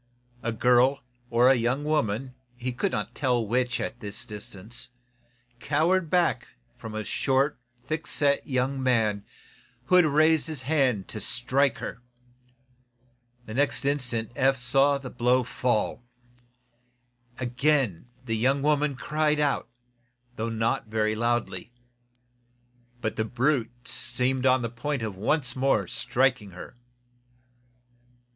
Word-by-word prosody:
A 115 - -2
girl, 125 +4 +3 0.3
or 125 +2 +5
young 125 +3 0
woman, 135 -5 -1 0.2
he 125 0 -3
could 185 +10 -1
not - - -3
tell 125 -5 +1
which, 125 +3 0
at 120 - -4
the 105 - -7 0.2
distance, 105 +3 -8 0.7
cowered 165 +5 +1
back 170 -8 +1 0.3
from 115 -3 -8
a 110 - -2
short, 135 +5 0 0.3
thick 155 +4 -3
set 140 -2 +1
young 130 0 0
man 110 -5 +1 0.6
who 180 - +3
had 180 - +6
raised 155 +1 +3
his 155 -5 -4
hand 130 -8 +1
to 105 - -5
strike 130 +4 +2
her. 125 - -6 1.4
The 110 - -8
next 140 +2 +1
instant 125 -6 -1
Eph 135 -1 +3
saw 135 +3 +3
the 135 -2 -8
blow 125 +1 +2
fall. 120 -1 -1 1.4
Again 125 - 0 0.2
the 115 -2 -1
young 135 +5 +1
woman 150 -1 +2
cried 150 +2 0
out, 145 -5 0 0.7
though 115 0 -2
not 115 0 -1
very 110 0 0
loudly. 120 +1 -1 1.3
But 110 - -2
the 110 - 0
brute 120 0 -1
seemed 130 +1 0
on 130 -1 +3
the 115 - -2
point 125 +2 -3
of 105 -3 -4
once 125 +5 0
more 130 -6 +2
striking 125 +3 0
her. 90 +4 -11
125 Hz, 125 wpm, -26 LUFS, 115-140 Hz, 1.4 s, had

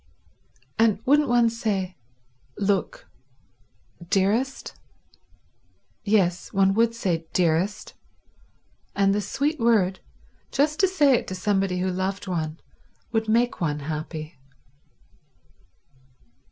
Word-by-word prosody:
And 220 -3 +4
wouldn't 290 +1 +4
one 240 -1 +4
say, 195 -5 -2 0.6
"Look—dearest?" 205 - -3 1.3
Yes, 185 -4 +1
one 195 0 +3
would 230 +2 +2
say 170 -7 -2
dearest 180 +3 0 1.0
and 195 0 +3
the 210 - 0
sweet 285 - -2
word, 210 -6 +2 0.5
just 300 +2 +1
to 385 - +5
say 295 -7 +3
it 245 - 0
to 185 - -4
somebody 195 -1 0
who 185 0 0
loved 190 +2 -3
one, 160 -4 -3 0.5
would 225 -1 -1
make 235 0 +1
one 150 -3 -1
happy. 155 0 -6
195 Hz, 100 wpm, -24 LUFS, 180-230 Hz, 1.3 s, to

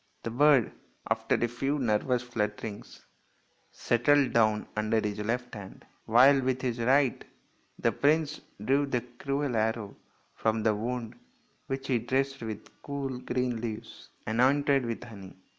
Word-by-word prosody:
The 115 - -3
bird, 140 0 +4 0.4
after - - +1
a 120 - +1
few 135 +5 -1
nervous 125 0 +1
flutter 105 -4 -3
ings, 105 -2 -9 0.7
settled 135 +4 +2
down 110 -2 +2
under 110 +1 +1
his 105 -1 -3
left 125 +3 -2
hand, 100 -3 -10 0.2
while 135 +5 +6
with 130 0 -1
his 120 -2 -1
right 130 +2 +2 0.5
the - - +1
prince 150 +1 +1 0.2
drew 140 +3 +2
the 125 -3 0 0.2
cruel 140 -2 -1
arrow 110 -2 -1 0.4
from 110 0 0
the 110 -1 +3
wound, 120 +2 -4 0.5
which 135 0 -4
he 125 -3 +2
dressed 135 +3 -1
with 110 -2 -8
cool, 135 -3 -4
green 125 -2 -2
leaves, 110 -2 -7 0.2
anointed 135 +3 +2
with 115 0 -4
honey. 100 -6 -11
120 Hz, 140 wpm, -29 LUFS, 110-135 Hz, 0.7 s, while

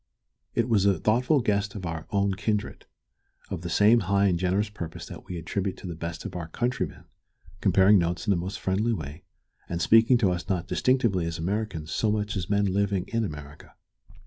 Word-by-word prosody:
It 115 -1 +2
was 105 -4 +3
a 100 -3 +3
thoughtful 125 - +2
guest 100 -2 0
of 95 -3 -6
our 80 -1 -5
own 100 -1 +1
kindred, 105 +2 -3 0.6
of 95 -4 -3
the 85 - -5
same 105 +7 +5
high 100 0 +2
and 90 -3 +2
generous 95 +4 +1
purpose 85 -6 -7
that - - -10
we 90 - -5
attribute 95 +4 -3
to - - -11
the 90 - -4
best 85 0 -6
of - - -6
our 85 -2 -4
countrymen, 120 +7 -3 0.6
comparing 95 +1 +5
notes 85 +1 -1
in 105 - +2
the - - +4
most 90 +3 -4
friendly 105 +5 0
way, 75 -3 -6 0.5
and 85 - -2
speaking 115 +6 +5
to 100 -6 +2
us 90 -1 -4
not 90 -2 0
distinctively 115 -10 +1
as 85 0 -4
Americans 90 -3 -3
so 110 - +1
much 105 0 -1
as 90 -4 -3
men 100 0 +2
living 100 -1 0
in 115 0 0
America. 75 -6 -8
100 Hz, 200 wpm, -26 LUFS, 85-105 Hz, 0.6 s, same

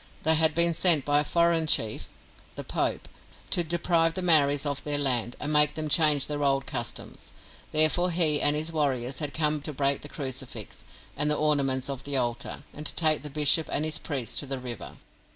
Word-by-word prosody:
They 160 - +3
had 160 -1 +2
been 170 0 +2
sent 160 -4 +3
by 145 0 +2
a - - 0
foreign 170 0 +1
chief 110 -7 0 0.5
(the - - -6
Pope) - - -2 0.4
to 175 - +3
deprive 165 0 0
the 185 - -2
Maoris 145 -4 +4
of 140 -1 -3
their 145 -1 -1
land, 125 -4 0
and 150 +1 -3
make 150 0 +4
them 155 0 -4
change 150 -2 +3
their 145 -1 -3
old 135 -1 0
customs. 120 -5 -7 0.4
Therefore 155 +4 +4
he 165 -4 +1
and 145 - +4
his 155 +2 -2
warriors 135 -5 -2
had 150 -3 -4
come 150 0 0
to 150 - -2
break 140 0 0
the 145 - -9
crucifix, 130 - -6 0.3
and 150 +1 +1
the 150 - +1
ornaments 140 -4 0
of 135 -2 -5
the 140 -1 -1
altar, 120 -2 -3
and 150 - -9
to - - -2
take 155 -2 +2
the 150 - -6
bishop 150 +2 +3
and 150 - 0
his 155 -1 +1
priests 135 -7 -4
to 145 - -1
the 135 0 -3
river. 125 -3 -8
150 Hz, 205 wpm, -26 LUFS, 135-155 Hz, 0.5 s, Maoris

